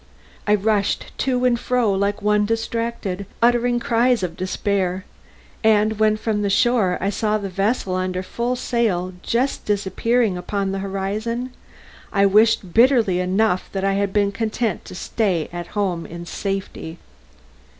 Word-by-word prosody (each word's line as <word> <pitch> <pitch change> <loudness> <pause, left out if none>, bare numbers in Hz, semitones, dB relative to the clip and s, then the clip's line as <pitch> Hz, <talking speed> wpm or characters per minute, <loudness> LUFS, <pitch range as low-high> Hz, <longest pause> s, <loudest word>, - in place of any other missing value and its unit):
I 210 - +5
rushed 205 0 0
to 255 -1 +1
and 240 -2 +3
fro 245 -5 +1
like 200 +1 -1
one 210 0 +3
distracted, 225 -4 -2
uttering 240 +1 +3
cries 235 -1 +2
of 170 -2 -3
despair, 185 0 -1 0.6
and 215 0 +3
when 215 0 +3
from 215 -1 -1
the 200 - 0
shore 220 -4 +2
I 195 - 0
saw 215 +1 0
the 200 -2 -5
vessel 195 +1 0
under 185 0 -2
full 240 +6 -2
sail 210 -8 -1
just 250 +7 -1
disappearing 205 +1 0
upon 195 +2 -2
the 195 - -2
horizon, 210 +6 -3 0.6
I 200 0 +3
wished 205 -2 +3
bitterly 230 -6 +4
enough 185 +1 +1
that 195 -1 -2
I 195 0 +2
had 200 0 0
been 200 0 +2
content 220 0 -2
to - - -9
stay 180 -5 -1
at 175 -1 -5
home 180 -5 -1
in 170 +1 -8
safety. 195 -3 -4
205 Hz, 150 wpm, -21 LUFS, 190-230 Hz, 0.6 s, I